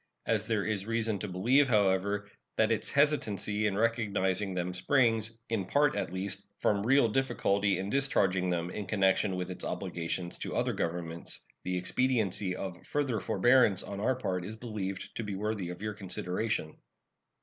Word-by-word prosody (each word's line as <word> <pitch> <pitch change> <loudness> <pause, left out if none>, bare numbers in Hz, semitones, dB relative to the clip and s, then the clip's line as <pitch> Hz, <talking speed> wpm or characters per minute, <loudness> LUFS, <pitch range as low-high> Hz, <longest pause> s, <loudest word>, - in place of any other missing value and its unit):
As 110 -1 0
there 110 -3 0
is 105 -2 -2
reason 115 -2 0
to 105 - -4
believe, 120 +10 +3
however, 100 -2 +2 0.3
that 110 0 +3
its 110 -1 +1
hesitancy 110 -8 +2
in 100 -1 -1
recognizing 105 -4 +1
them 90 0 -2
springs, 115 +1 +2
in 110 -4 -1
part 145 +6 +2
at - - -2
least, 95 +1 -3
from 100 -1 +1
real 130 +2 +5
difficulty 100 -5 +1
in 95 +2 -3
discharging 95 -10 +2
them 85 0 -1
in 105 -1 -5
connection 95 -1 +2
with 90 0 -3
its 90 - -5
obligations 85 +1 -3
to - - -4
other - - +1
governments, 85 0 -3 0.2
the 90 0 -1
expediency 105 -2 0
of 90 -2 -6
further 140 -7 -1
forbearance 120 -4 +4
on 100 -1 -6
our 130 +5 +1
part 95 -8 -2
is 105 +5 -6
believed 105 -5 -4
to 115 - -2
be 105 -2 -4
worthy 105 -2 -2
of 90 +3 -7
your 105 0 -2
consideration. 95 -2 -2
105 Hz, 165 wpm, -30 LUFS, 95-115 Hz, 0.3 s, real